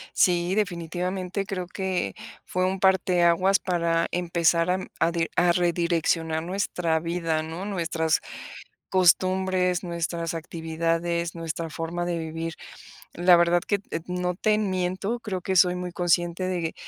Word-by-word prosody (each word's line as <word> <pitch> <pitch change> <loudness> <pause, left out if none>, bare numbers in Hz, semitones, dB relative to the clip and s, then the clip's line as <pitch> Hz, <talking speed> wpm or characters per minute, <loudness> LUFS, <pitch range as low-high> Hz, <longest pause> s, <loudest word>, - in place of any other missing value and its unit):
Sí, 175 +1 +3
definitivamente 180 0 -2
creo 185 -2 -4
que 190 0 -2 0.3
fue 185 0 -1
un 190 0 -2
parteaguas 185 0 +3
para 170 -2 0
empezar 170 0 +1
a - - +3
m 190 - -4
a 165 - +3
di 165 -1 0
a 175 0 +4
redireccionar 170 -2 +1
nuestra 180 -3 -1
vida, 165 -1 -1
¿no? 165 +4 -6
Nuestras 170 -5 0 0.7
costumbres, 185 0 +2
nuestras 170 -1 -3
actividades, 165 +1 -2
nuestra 165 0 -4
forma 170 +2 -4
de 175 -1 -1
vivir. 165 0 -4 0.6
La 175 0 +5
verdad 175 0 +3
que, 205 - +1 0.2
eh, 165 - -2
t - - -18
no 180 0 -2
te 215 +3 +2
miento. 190 +3 -1
Creo 190 -5 -4
que 190 -1 -1
soy 180 0 +5
muy 180 -1 -5
consciente 175 +1 +1
de 175 -3 -2
175 Hz, 140 wpm, -25 LUFS, 165-185 Hz, 0.7 s, La